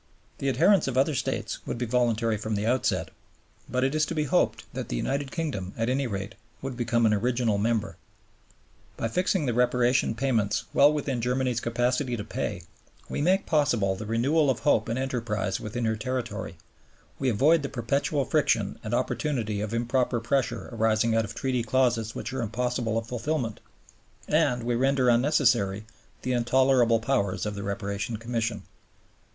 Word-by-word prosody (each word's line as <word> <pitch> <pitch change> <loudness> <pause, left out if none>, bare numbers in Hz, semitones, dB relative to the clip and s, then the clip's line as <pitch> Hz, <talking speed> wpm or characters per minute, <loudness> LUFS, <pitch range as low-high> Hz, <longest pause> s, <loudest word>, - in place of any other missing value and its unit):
The 140 - 0
adherence 175 +9 +4
of 130 -1 -2
other 140 +4 +3
States 130 - -2
would - - -3
be 120 - -2
voluntary 115 -2 +1
from 110 +1 -3
the 105 +1 -1
outset. 125 +3 0 0.6
But 125 +1 0
it 135 +1 +1
is 155 0 +2
to 170 - -4
be 155 - +1
hoped 145 - +1
that - - -5
the - - -2
United 135 - -2
Kingdom, 130 - -3
at 115 +1 0
any 135 +1 0
rate, 100 0 -4 0.3
would 135 -1 -5
become 120 -1 +1
an 110 - +4
original 115 -1 +1
member. 110 0 -1 1.0
By 115 - -1
fixing 180 - +1
the 120 - 0
Reparation 125 0 +2
payments 115 -5 0
well 145 +1 +6
within 140 -5 -2
Germany's 125 0 0
capacity 125 +2 0
to 105 - -4
pay, - - -4 0.5
we - - -2
make 185 +5 +2
possible 120 -11 +2
the 105 +2 -7
renewal 135 +7 +2
of 130 - 0
hope 110 +1 +2
and 115 - -1
enterprise 115 -7 -2
within 115 +2 -3
her 110 0 +1
territory, 125 +1 -4 0.6
we 135 - +1
avoid 150 +9 +4
the 140 - -4
perpetual 140 +3 0
friction - - +1
and - - -1
opportunity 110 -9 -1
of 105 0 -3
improper 120 +1 0
pressure 120 0 -1
arising 110 0 +2
out 115 0 +2
of 105 - -9
Treaty 130 -2 -1
clauses 115 -2 +1
which 125 - -5
are 130 - -2
impossible 120 0 -1
of 115 - -2
fulfilment, 120 0 -2 0.7
and 120 -1 +2
we 120 +1 0
render 130 +1 +2
unnecessary 115 -6 +2 0.4
the 130 - -1
intolerable 120 -1 +3
powers 110 -6 0
of 105 - -2
the 100 - -5
Reparation 100 +2 -3
Commission. 115 -2 -2
120 Hz, 170 wpm, -27 LUFS, 110-130 Hz, 1.0 s, well